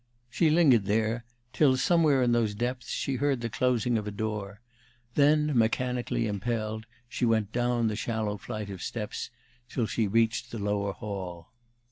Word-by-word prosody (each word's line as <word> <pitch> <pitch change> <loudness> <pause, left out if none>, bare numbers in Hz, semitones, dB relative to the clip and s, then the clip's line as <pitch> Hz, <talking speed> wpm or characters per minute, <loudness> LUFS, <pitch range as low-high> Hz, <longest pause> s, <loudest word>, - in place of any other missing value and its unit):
She 160 +5 +3
lingered 145 - +5
there 110 +3 0 0.3
till, 135 -4 +4
somewhere 145 -1 +3
in 120 - +2
those 115 -3 +1
depths, 125 +3 -3
she 135 -2 -1
heard 140 0 +1
the 115 -1 -3
closing 125 -1 +1
of 105 - -6
a - - -3
door; 105 -1 -4 0.5
then, 150 0 +3
mechanically 120 +1 +1
impelled, 110 +1 -3 0.2
she 120 - -4
went 110 -3 +2
down 120 0 +1
the 110 - -1
shallow 110 -2 -2
flights 105 +1 -5
of 95 -2 -7
steps 105 -3 -4 0.4
till 120 - -1
she 110 0 0
reached 115 +3 +1
the 115 - -6
lower 100 -1 -1
hall. 90 -5 -6
115 Hz, 160 wpm, -28 LUFS, 105-125 Hz, 0.5 s, lingered